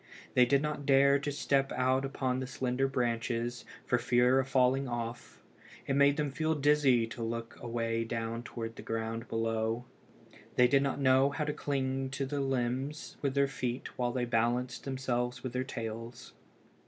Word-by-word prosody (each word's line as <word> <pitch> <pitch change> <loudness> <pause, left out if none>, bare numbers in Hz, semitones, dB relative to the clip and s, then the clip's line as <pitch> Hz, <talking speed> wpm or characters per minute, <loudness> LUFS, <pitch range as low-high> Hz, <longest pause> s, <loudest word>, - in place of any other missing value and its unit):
They 125 -1 +5
did 140 +2 +3
not 150 -2 -3
dare 140 0 +5
to 145 +1 -3
step 135 -1 +1
out 130 +1 +1
upon 130 -2 -1
the 130 - -4
slender 130 0 0
branches, 120 -1 -1 0.2
for 125 - +2
fear 125 +2 +4
of 135 - 0
falling 135 0 +2
off. 120 -1 -5 0.4
It 135 - -1
made 140 0 +5
them 150 -2 0
feel 160 +3 0
dizzy 145 -5 +4
to 115 +1 -8
look 115 0 -4
away 115 -1 -1
down 115 0 -3
to 115 -1 -5
the - - -10
ground 115 +1 -3
below. 115 +1 -1 0.7
They 125 - +6
did 135 +2 +4
not 140 0 -1
know 130 0 +4
how 150 +2 -2
to 150 - -1
cling 135 -2 -2
to 135 - -1
the 140 +1 -2
limbs 135 +2 -2
with 140 -1 -1
their 140 0 +4
feet 125 -2 -4
while 120 -1 0
they 125 0 -1
balanced 120 +1 0
themselves 125 -2 -2
with 130 -2 -4
their 125 0 0
tails. 115 0 -6
125 Hz, 175 wpm, -31 LUFS, 120-135 Hz, 0.7 s, They